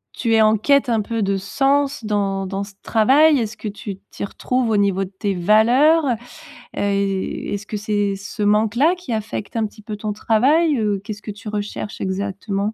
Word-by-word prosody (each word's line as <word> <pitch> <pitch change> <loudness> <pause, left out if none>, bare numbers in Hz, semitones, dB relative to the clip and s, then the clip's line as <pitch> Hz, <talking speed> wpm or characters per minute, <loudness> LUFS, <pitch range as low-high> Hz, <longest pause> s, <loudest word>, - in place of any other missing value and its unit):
tu 230 -2 0
es 220 - +5
en 215 0 +4
quête 280 +3 +2
un 225 -2 +2
peu 225 0 -2
de 195 0 0
sens 275 +5 0
dans 195 -2 -1
dans 195 +1 -3
ce 200 0 -11
travail? 275 +6 +4
Est-ce 220 -1 -3
que 215 - -6
tu 205 -1 -6
t'y - - -6
retrouves 250 +4 -1
au 215 - +2
niveau 195 -1 +2
de - - -12
tes 200 +1 -3
valeurs? 240 - +4 0.7
Heu, - - -1
est-ce 200 0 -2
que 210 - -4
c'est 205 -1 -1
ce 205 +2 -5
manque-là 225 - +3
qui 350 -10 -5
affecte 215 0 -4
un 225 -1 +1
petit 215 +1 -10
peu 210 0 -6
ton 210 0 -4
travail? 275 +9 +2
Heu, 205 -2 0
qu'est-ce 205 0 -7
que 210 - -6
tu 205 +2 -11
recherches 210 0 -5
exactement? 200 +2 -2
210 Hz, 195 wpm, -20 LUFS, 200-235 Hz, 0.7 s, es